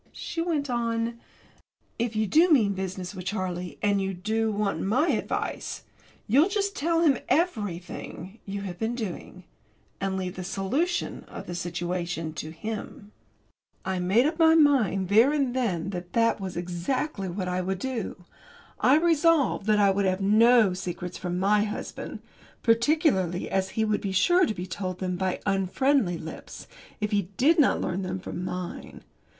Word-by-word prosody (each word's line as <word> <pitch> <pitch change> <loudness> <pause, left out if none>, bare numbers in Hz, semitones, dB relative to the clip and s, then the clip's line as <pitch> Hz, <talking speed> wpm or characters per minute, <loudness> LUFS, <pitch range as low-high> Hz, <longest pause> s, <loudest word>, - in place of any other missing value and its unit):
She 330 - -4
went 320 -4 -1
on: 235 -1 -1 0.8
"If 235 -1 -1
you 215 0 +2
do 325 - +4
mean 225 -10 +4
business 185 0 -5
with 185 -2 -8
Charlie, 180 -3 -3
and 200 -1 +2
you 190 0 -2
do 220 +4 0
want 205 -1 -1
my 255 - +2
advice, - - -2 0.4
you'll 280 - +4
just 400 0 -1
tell 330 +3 +1
him 285 -7 +4
everything 205 - -2
you 200 0 -5
have 180 -3 -6
been 225 +2 -1
doing, 185 -4 -6 0.6
and 195 -1 -1
leave 185 -1 -4
the 185 - -4
solution 230 - -1
of - - -9
the 175 - -6
situation 175 -1 -3
to 155 0 -6
him." 205 +4 -7 0.7
I 190 -1 -1
made 195 +8 +3
up 315 +2 -1
my 320 0 +6
mind 250 - +3
there 225 +7 +6
and 275 -4 0
then 195 -8 -1
that 175 -2 -7
that 230 -2 +2
was 185 -3 -5
exactly 185 - -2
what 185 +1 -3
I 180 0 -1
would 190 +1 -2
do. 225 -5 -4 0.5
I 270 +4 +5
resolved 320 - +3
that 215 -1 +4
I 200 -1 +5
would 200 +1 0
have 185 0 +1
no 215 +1 +5
secrets 180 -1 -5
from 180 -1 -3
my 205 +3 +3
husband 210 - -6 0.4
particularly 230 - +2
as 190 0 0
he 220 - +3
would 215 -1 0
be 195 -2 -3
sure 350 - +4
to - - -1
be 180 -1 -5
told 185 0 -4
them 180 -1 -2
by 185 0 -2
unfriendly 195 +1 +1
lips 160 0 -9 0.3
if 210 0 -2
he 200 -4 0
did 315 +5 +4
not 290 - +4
learn 180 +2 -2
them 185 0 -3
from 180 -1 -6
mine. 180 -1 -6
200 Hz, 165 wpm, -27 LUFS, 185-245 Hz, 0.8 s, my